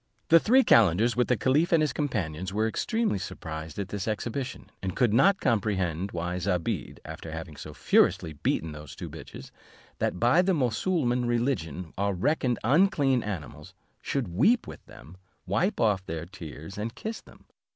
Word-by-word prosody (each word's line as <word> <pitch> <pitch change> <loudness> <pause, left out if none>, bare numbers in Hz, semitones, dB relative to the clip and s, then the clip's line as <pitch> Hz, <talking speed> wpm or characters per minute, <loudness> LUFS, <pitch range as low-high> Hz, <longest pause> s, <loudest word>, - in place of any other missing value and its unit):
The 165 - +8
three 255 +9 +5
calenders, 110 - +4
with 125 0 +2
the 125 - +2
caliph 140 - +2
and 165 -2 +4
his 150 -4 0
companions, 95 - -2
were 110 +2 +1
extremely 220 - 0
surprised 80 -5 -7
at 100 -1 -4
this 100 0 -4
exhibition, 120 +5 -4
and 95 -2 -3
could 120 -4 +2
not 195 - +5
comprehend 95 -4 0
why 90 +1 -3
Zobeide, 90 -1 -2
after 80 - -8
having 80 -1 -7
so - - -9
furiously 80 - +2
beaten 80 +2 -1
those 75 0 -10
two - - -7
bitches, 65 - -10 0.5
that 90 - -1
by 125 - +5
the 190 +1 +2
moosulman 125 -1 0
religion 90 - -1
are 100 -1 +1
reckoned 125 - +1
unclean 140 - +3
animals, 85 - -7 0.3
should 135 -9 -2
weep 215 - +3
with - - -10
them, 85 +4 -14 0.3
wipe - - 0
off 105 -4 +2
their 80 0 -4
tears, 85 0 -9
and 115 +2 -4
kiss 220 +1 -5
them. - - -19
105 Hz, 165 wpm, -27 LUFS, 85-130 Hz, 0.5 s, The